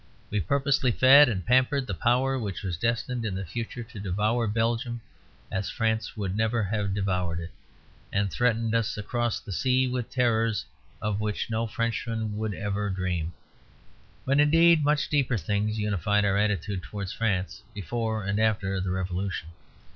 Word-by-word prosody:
We 105 - +1
purposely 135 - +1
fed 135 +4 +7
and 95 -6 -3
pampered 130 +2 +3
the 105 - -4
power 125 +7 +1
which 100 -4 -4
was 90 -3 -2
destined 115 +5 -1
in 105 -4 -2
the 95 0 -4
future 115 +6 -5
to 115 -2 -11
devour 105 +5 0
Belgium 115 +3 0 0.5
as 95 -1 -2
France 110 +3 -1
would 95 -2 -2
never 110 +1 +1
have 100 -1 -1
devoured 90 -4 -1
it, 85 +1 -7 0.6
and 100 -1 0
threaten 115 -2 +1
us 115 -3 0
across 120 +3 -1
the 105 - -10
sea 130 +6 +2
with 125 -2 -3
terrors 115 - +1 0.4
of 105 0 -1
which 105 +1 -2
no 115 +1 0
Frenchman 115 -1 -2
would 110 -2 -2
ever 105 +1 -2
dream. 90 -3 -2 0.9
But 140 +2 +2
indeed 165 +2 +5
much 150 0 +2
deeper 135 -5 +1
things 105 +4 -1
unified 105 0 +1
our 100 -1 +2
attitude 100 -2 0
towards 100 0 -6
France 100 -5 -1
before 110 +2 -2
and 100 +2 0
after 100 -3 +1
the 95 - -2
Revolution. 95 -2 -3
110 Hz, 160 wpm, -27 LUFS, 100-120 Hz, 0.9 s, fed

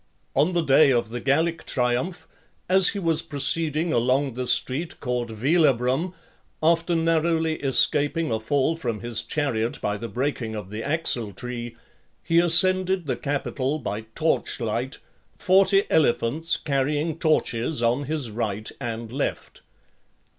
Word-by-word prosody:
On 170 +5 +2
the 170 -1 +1
day 140 0 +5
of 120 -4 0
the 120 +2 -5
Gallic 160 +6 0
triumph, 125 +8 -2 0.4
as 190 0 +9
he - - -1
was 165 -4 +2
proceeding 155 +2 -1
along 130 +3 +1
the 125 +1 -4
street 155 +9 0
called 125 -2 -3
Velabrum, 135 - +1 0.5
after 165 +1 +2
narrowly 165 -1 +1
escaping 145 +4 +1
a 110 - 0
fall 140 +7 0
from 120 -9 -4
his 120 -1 -2
chariot 120 -2 -2
by 105 0 -2
the 115 +3 -6
breaking 120 0 -3
of 105 -2 -7
the 105 +1 -5
axle 125 -7 -1
tree, 120 +2 -7 0.5
he 165 0 +2
ascended 185 +1 +4
the 140 - -1
Capitol 140 0 -2
by 110 -6 -4
torch 160 -2 -1
light, 120 +3 -3 0.4
forty 195 +1 +3
elephants 155 +2 +1
carrying 150 +3 -1
torches 125 -4 0
on 120 +5 +1
his 145 -5 -3
right 110 -1 -3
and 115 -1 -5
left. 140 +3 -4
140 Hz, 140 wpm, -24 LUFS, 120-165 Hz, 0.5 s, as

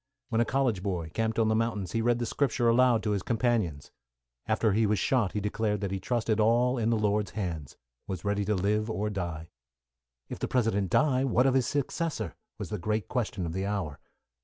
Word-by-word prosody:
When 115 -1 +2
a - - +3
college 125 -6 +1
boy, 90 -5 -3
camped 110 0 -1
on 115 -1 +3
the 110 - +2
mountains, 110 -5 -1
he 115 - 0
read 120 +1 +2
the 120 - -2
Scriptures 120 0 0
aloud 120 0 +4
to 105 - 0
his 100 -2 0
companions. 110 - -1 0.6
After 110 -1 +2
he 110 +1 +3
was 105 0 +2
shot, 105 +1 +1
he 105 - -1
declared 105 0 -1
that 100 -2 -2
he 95 - -2
trusted 115 +1 0
all 120 +3 +3
in 115 0 +1
the 115 - +2
Lord's 105 -2 0
hand 85 -8 -4 0.3
was 95 0 -5
ready 100 0 +1
to 105 +1 +1
live 105 +4 0
or 105 -1 -2
die. 85 -4 -4 0.8
"If - - -7
the - - -1
President 110 -6 +1
die, 135 - +3
what 125 -1 +3
of 135 - +4
his 130 -2 +2
successor?" 145 - -2 0.2
was - - -5
the 105 - -3
great 105 +2 -2
question 110 -7 -2
of 80 - -4
the 95 +2 -2
hour. 95 -8 -3
110 Hz, 210 wpm, -29 LUFS, 100-120 Hz, 0.8 s, aloud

